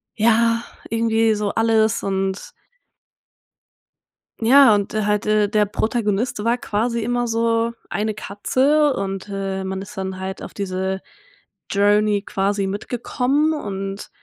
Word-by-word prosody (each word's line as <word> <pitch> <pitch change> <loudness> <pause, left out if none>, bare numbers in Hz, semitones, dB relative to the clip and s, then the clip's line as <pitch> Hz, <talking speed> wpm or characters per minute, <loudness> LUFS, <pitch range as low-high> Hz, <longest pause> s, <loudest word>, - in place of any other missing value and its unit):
ja, 230 +1 +3 0.3
irgendwie 225 -1 +2
so 210 -1 -1
alles. 225 -1 +2
Und 195 0 -2 1.9
ja 255 0 +7
und, 200 0 -2
äh, 215 0 0
halt, 210 +1 0
äh, 215 -1 +3
der 210 0 +2
Protagonist 210 +1 -1
war 235 +2 +2
quasi 230 +1 -1
immer 245 +1 0
so 230 0 +1 0.2
eine 210 +4 -1
Katze. 265 +9 +1
Und, 195 -1 -4
äh, 195 -1 -3
man 190 0 -4
ist 195 - -10
dann 190 -1 -4
halt 190 +1 -5
auf - - -9
diese 190 -1 -3 0.7
Journey 205 +1 +3
quasi 195 0 -1
mitgekommen 250 +8 0
und 195 -7 -5
210 Hz, 125 wpm, -21 LUFS, 195-230 Hz, 1.9 s, ja